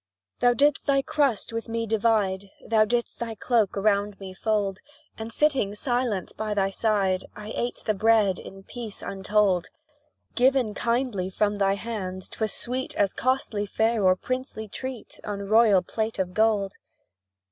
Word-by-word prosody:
Thou 245 Hz, 0 st, +4 dB
didst 290 Hz, +2 st, +2 dB
thy 275 Hz, -1 st, +3 dB
crust 280 Hz, -8 st, 0 dB
with 230 Hz, 0 st, -4 dB
me 230 Hz, 0 st, -1 dB
divide, 205 Hz, -3 st, +1 dB, 0.2 s
Thou 220 Hz, -1 st, +4 dB
didst 235 Hz, +2 st, -1 dB
thy 230 Hz, -1 st, -4 dB
cloak 220 Hz, -2 st, +1 dB
around 200 Hz, 0 st, +1 dB
me 190 Hz, -1 st, -8 dB
fold; 200 Hz, -1 st, -1 dB, 0.4 s
And, 225 Hz, +1 st, -6 dB
sitting 260 Hz, -7 st, +2 dB
silent 240 Hz, -5 st, -1 dB
by 215 Hz, -1 st, -2 dB
thy 195 Hz, -1 st, +1 dB
side, 195 Hz, -3 st, +1 dB
I 210 Hz, +1 st, -7 dB
ate 240 Hz, +1 st, -3 dB
the 215 Hz, -, +2 dB
bread 210 Hz, -2 st, +3 dB
in 195 Hz, 0 st, -11 dB
peace 225 Hz, -1 st, -7 dB
untold: 195 Hz, -2 st, +1 dB, 0.7 s
Given 255 Hz, -3 st, +3 dB
kindly 235 Hz, -4 st, -1 dB
from 205 Hz, +2 st, 0 dB
thy 195 Hz, -1 st, +2 dB
hand, 195 Hz, -4 st, -5 dB
'twas 220 Hz, -2 st, -1 dB
sweet 255 Hz, +2 st, -2 dB
As 200 Hz, -2 st, +2 dB
costly 245 Hz, -5 st, 0 dB
fare 220 Hz, +1 st, +1 dB
or 185 Hz, -1 st, +5 dB
princely 255 Hz, -1 st, -4 dB
treat 260 Hz, +3 st, -7 dB
On 200 Hz, -1 st, -4 dB
royal 215 Hz, -3 st, +5 dB
plate 220 Hz, +4 st, -3 dB
of 185 Hz, -2 st, -2 dB
gold. 210 Hz, -2 st, +2 dB
215 Hz, 155 wpm, -26 LUFS, 195-235 Hz, 0.7 s, or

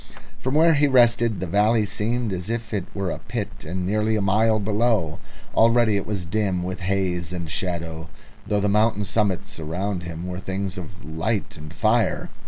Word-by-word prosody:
From 130 Hz, +2 st, -2 dB
where 165 Hz, +1 st, +6 dB
he 145 Hz, -1 st, +4 dB
rested 120 Hz, -4 st, +4 dB
the -, -, -1 dB
valley 105 Hz, +5 st, +3 dB
seemed 110 Hz, +2 st, -1 dB
as 90 Hz, +2 st, -4 dB
if 115 Hz, -1 st, -3 dB
it 100 Hz, -4 st, -1 dB
were 95 Hz, -3 st, -1 dB
in -, -, -3 dB
a -, -, -13 dB
pit -, -, -4 dB, 0.2 s
and 90 Hz, +2 st, -3 dB
nearly 105 Hz, +3 st, +1 dB
a -, -, +1 dB
mile 110 Hz, +3 st, +3 dB
below. 105 Hz, -5 st, +1 dB, 0.3 s
Already 115 Hz, -1 st, +4 dB
it 100 Hz, -, -1 dB
was 100 Hz, -4 st, -3 dB
dim 95 Hz, -1 st, 0 dB
with 95 Hz, +2 st, -4 dB
haze 90 Hz, -3 st, -1 dB
and 85 Hz, -2 st, -4 dB
shadow, 85 Hz, -2 st, -3 dB, 0.4 s
though 105 Hz, -, +1 dB
the 105 Hz, -, +1 dB
mountain 105 Hz, +1 st, +2 dB
summits 100 Hz, -4 st, -1 dB
around 90 Hz, +4 st, -2 dB
him 85 Hz, -1 st, -6 dB
were 90 Hz, 0 st, -4 dB
things 95 Hz, 0 st, -3 dB
of 90 Hz, +2 st, -10 dB
light 95 Hz, +6 st, -2 dB
and 75 Hz, -1 st, -10 dB
fire. 110 Hz, +5 st, +1 dB
100 Hz, 190 wpm, -23 LUFS, 90-110 Hz, 0.4 s, where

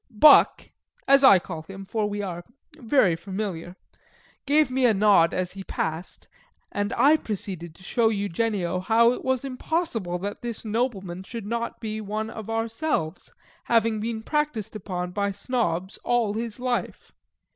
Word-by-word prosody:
Buck 265 Hz, +5 st, +6 dB, 0.4 s
(as 275 Hz, 0 st, +6 dB
I 230 Hz, -8 st, +9 dB
call 170 Hz, -2 st, -6 dB
him, 195 Hz, +4 st, -10 dB
for 210 Hz, +1 st, -1 dB
we 205 Hz, 0 st, -3 dB
are 175 Hz, -3 st, -5 dB, 0.3 s
very 230 Hz, -, +2 dB
familiar) 185 Hz, -1 st, -5 dB, 0.7 s
gave 295 Hz, -1 st, +3 dB
me 255 Hz, -1 st, +3 dB
a 220 Hz, -, +3 dB
nod 195 Hz, -5 st, +5 dB
as 185 Hz, -1 st, -2 dB
he 195 Hz, 0 st, -8 dB
passed, 160 Hz, -1 st, -4 dB, 0.4 s
and 205 Hz, +1 st, -2 dB
I 285 Hz, +6 st, +6 dB
proceeded 185 Hz, -, -5 dB
to 185 Hz, -, -17 dB
show 225 Hz, +2 st, +2 dB
Eugenio 200 Hz, -3 st, -1 dB
how 230 Hz, +5 st, +4 dB
it 250 Hz, -, -5 dB
was 260 Hz, 0 st, 0 dB
impossible 255 Hz, -, -2 dB
that 200 Hz, +3 st, -5 dB
this 235 Hz, -2 st, -6 dB
nobleman 210 Hz, -6 st, -2 dB
should 225 Hz, +2 st, -7 dB
not 235 Hz, +2 st, -3 dB
be 220 Hz, -1 st, -4 dB
one 215 Hz, +2 st, -4 dB
of 220 Hz, -1 st, -8 dB
ourselves, 225 Hz, -, -2 dB, 0.3 s
having 230 Hz, -2 st, +2 dB
been 220 Hz, 0 st, -3 dB
practised 295 Hz, -8 st, -2 dB
upon 180 Hz, -3 st, -4 dB
by 200 Hz, +2 st, -1 dB
Snobs 195 Hz, -4 st, -2 dB
all 235 Hz, -4 st, +1 dB
his 225 Hz, +1 st, -4 dB
life. 250 Hz, -1 st, -3 dB
215 Hz, 155 wpm, -25 LUFS, 190-235 Hz, 0.7 s, I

